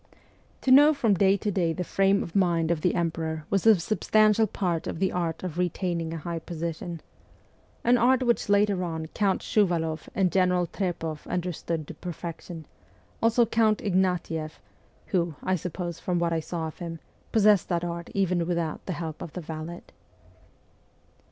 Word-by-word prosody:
To 260 Hz, -, +1 dB
know 295 Hz, +3 st, +8 dB
from 225 Hz, -6 st, +2 dB
day 195 Hz, +1 st, +4 dB
to 205 Hz, +2 st, -2 dB
day 175 Hz, -4 st, +1 dB
the 180 Hz, -, -3 dB
frame 195 Hz, +2 st, +2 dB
of 165 Hz, -, -10 dB
mind 170 Hz, -4 st, +2 dB
of 165 Hz, -2 st, 0 dB
the 180 Hz, -, +1 dB
emperor 160 Hz, -2 st, -2 dB
was 195 Hz, +2 st, +2 dB
a 215 Hz, -5 st, +7 dB
substantial 215 Hz, +3 st, +3 dB
part 175 Hz, -4 st, -2 dB
of -, -, -4 dB
the 190 Hz, +2 st, +1 dB
art 170 Hz, -2 st, -2 dB
of 175 Hz, -2 st, -4 dB
retaining 175 Hz, -2 st, -1 dB
a 165 Hz, -, -4 dB
high 165 Hz, +2 st, -4 dB
position 170 Hz, 0 st, -5 dB, 0.8 s
an 240 Hz, +1 st, +4 dB
art 255 Hz, +2 st, +4 dB
which 235 Hz, -4 st, +1 dB
later 200 Hz, -2 st, +3 dB
on 160 Hz, -2 st, -3 dB
Count 195 Hz, -3 st, +1 dB
Shuvaloff 165 Hz, -6 st, 0 dB
and 190 Hz, -3 st, +2 dB
General 180 Hz, 0 st, +2 dB
Trepoff 165 Hz, -4 st, -4 dB
understood 170 Hz, -3 st, -3 dB
to -, -, -7 dB
perfection; 170 Hz, -1 st, -7 dB, 0.6 s
also 230 Hz, +1 st, +4 dB
Count 220 Hz, -1 st, +2 dB
Ignatieff, 180 Hz, -5 st, -1 dB, 0.5 s
who, 170 Hz, -4 st, -1 dB
I 185 Hz, -, +1 dB
suppose 175 Hz, 0 st, -5 dB
from 180 Hz, -1 st, -1 dB
what 170 Hz, -1 st, +1 dB
I 165 Hz, -, +1 dB
saw 160 Hz, +1 st, -4 dB
of 160 Hz, -, -8 dB
him, 165 Hz, -1 st, -6 dB, 0.3 s
possessed 210 Hz, -3 st, +4 dB
that 170 Hz, -1 st, 0 dB
art 170 Hz, 0 st, -4 dB
even 180 Hz, -3 st, +1 dB
without 170 Hz, -3 st, -2 dB
the 185 Hz, -, -1 dB
help 160 Hz, -1 st, -6 dB
of 160 Hz, -, -7 dB
the 180 Hz, -, -5 dB
valet. 160 Hz, +2 st, -7 dB
175 Hz, 170 wpm, -27 LUFS, 165-195 Hz, 0.8 s, know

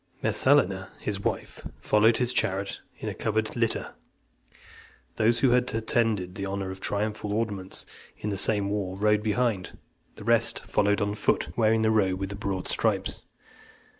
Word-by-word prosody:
Messalina, 95 Hz, +1 st, +3 dB
his 100 Hz, -2 st, -3 dB
wife, 100 Hz, -, -4 dB, 0.2 s
followed 110 Hz, +2 st, +4 dB
his 125 Hz, 0 st, 0 dB
chariot 100 Hz, -4 st, -1 dB, 0.2 s
in -, -, -6 dB
a -, -, -2 dB
covered 110 Hz, 0 st, -1 dB
litter. 115 Hz, -2 st, -1 dB, 1.2 s
Those 115 Hz, +2 st, +3 dB
who 130 Hz, -, +4 dB
had 125 Hz, 0 st, +2 dB
attained 110 Hz, -5 st, 0 dB
the 100 Hz, -, -6 dB
honour 95 Hz, -1 st, -3 dB
of 95 Hz, -, -8 dB
triumphal 105 Hz, 0 st, -2 dB
ornaments 105 Hz, -3 st, -2 dB, 0.3 s
in 105 Hz, -, -3 dB
the -, -, -1 dB
same 100 Hz, 0 st, +2 dB
war, 95 Hz, -2 st, -2 dB
rode 105 Hz, +1 st, +3 dB
behind; 105 Hz, -2 st, -1 dB, 0.4 s
the -, -, -10 dB
rest -, -, +2 dB
followed 105 Hz, 0 st, +1 dB
on 100 Hz, 0 st, 0 dB
foot, 105 Hz, -, 0 dB
wearing 110 Hz, -1 st, +3 dB
the 110 Hz, -, +3 dB
robe 95 Hz, -4 st, +2 dB
with 95 Hz, 0 st, -3 dB
the 100 Hz, -, -5 dB
broad 100 Hz, -2 st, -3 dB
stripes. -, -, 0 dB
105 Hz, 160 wpm, -27 LUFS, 100-110 Hz, 1.2 s, followed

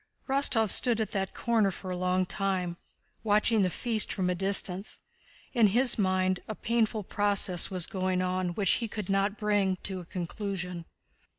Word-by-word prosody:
Rostóv 260 Hz, -6 st, +2 dB
stood 240 Hz, -3 st, +3 dB
at 220 Hz, -, -2 dB
that 195 Hz, -1 st, -3 dB
corner 225 Hz, -4 st, +1 dB
for 185 Hz, 0 st, -7 dB
a -, -, -3 dB
long 185 Hz, +1 st, 0 dB
time, 185 Hz, -2 st, -2 dB, 0.5 s
watching 215 Hz, +1 st, +2 dB
the 185 Hz, -, +2 dB
feast 220 Hz, +4 st, -1 dB
from 180 Hz, -2 st, -1 dB
a -, -, +1 dB
distance. 195 Hz, +1 st, +1 dB, 0.5 s
In 235 Hz, -4 st, +4 dB
his 240 Hz, +4 st, +3 dB
mind, 185 Hz, -1 st, +1 dB
a 215 Hz, -, -5 dB
painful 220 Hz, -2 st, -1 dB
process 200 Hz, -3 st, +2 dB
was 185 Hz, -4 st, +1 dB
going 185 Hz, -1 st, -2 dB
on 185 Hz, -1 st, -2 dB
which 200 Hz, -3 st, +1 dB
he 230 Hz, -, 0 dB
could 210 Hz, -3 st, -6 dB
not 195 Hz, +1 st, 0 dB
bring 205 Hz, -3 st, +1 dB
to 190 Hz, -1 st, -2 dB
a 175 Hz, -, -10 dB
conclusion. 180 Hz, -1 st, -5 dB
195 Hz, 170 wpm, -28 LUFS, 185-215 Hz, 0.5 s, In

